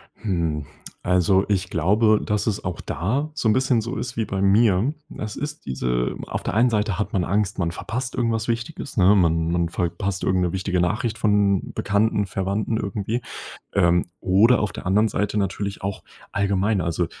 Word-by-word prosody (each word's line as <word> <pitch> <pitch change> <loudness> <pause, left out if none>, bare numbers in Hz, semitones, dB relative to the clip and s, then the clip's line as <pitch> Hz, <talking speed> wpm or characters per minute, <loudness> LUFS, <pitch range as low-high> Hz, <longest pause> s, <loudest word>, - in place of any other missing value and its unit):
Hm. 85 -7 -2 0.4
Also, 90 +2 +3
ich 95 -3 0
glaube, 105 +6 +3
dass 105 0 -1
es 105 -2 -1
auch 90 -2 -3
da 130 - -2
so 150 -6 -1
'n 110 - +5
bisschen 130 -1 +2
so 120 +4 -4
ist 120 -3 -5
wie 110 - 0
bei 95 -1 -3
mir. 100 +4 +3 0.2
Es 110 -1 -5
ist 150 +1 -5
diese 60 -2 -1
auf - - -4
der - - -2
einen 120 +4 +4
Seite 105 -3 0
hat 105 - -2
man 95 - +1
Angst, 100 +2 0
man 85 -2 0
verpasst 125 +7 -4
irgendwas 115 -2 -1
Wichtiges, 115 +4 -4
ne? 95 +1 +6
Man 80 -3 +2
man 85 -1 +1
verpasst 90 +2 -2
irgendeine 90 -2 +1
wichtige 95 -1 -1
Nachricht 110 +5 -1
von 105 -3 +2
Bekannten, 105 0 +1
Verwandten 100 +3 -2
irgendwie. 105 +4 -2 0.5
Ähm, 90 -2 +3
oder 105 +7 +4
auf 105 - -1
der - - -8
anderen 105 +4 +3
Seite 105 0 -1
natürlich 100 0 -2
auch 100 0 -4 0.3
allgemein. 100 0 +1
Also, 85 0 0
100 Hz, 180 wpm, -23 LUFS, 90-110 Hz, 0.5 s, ne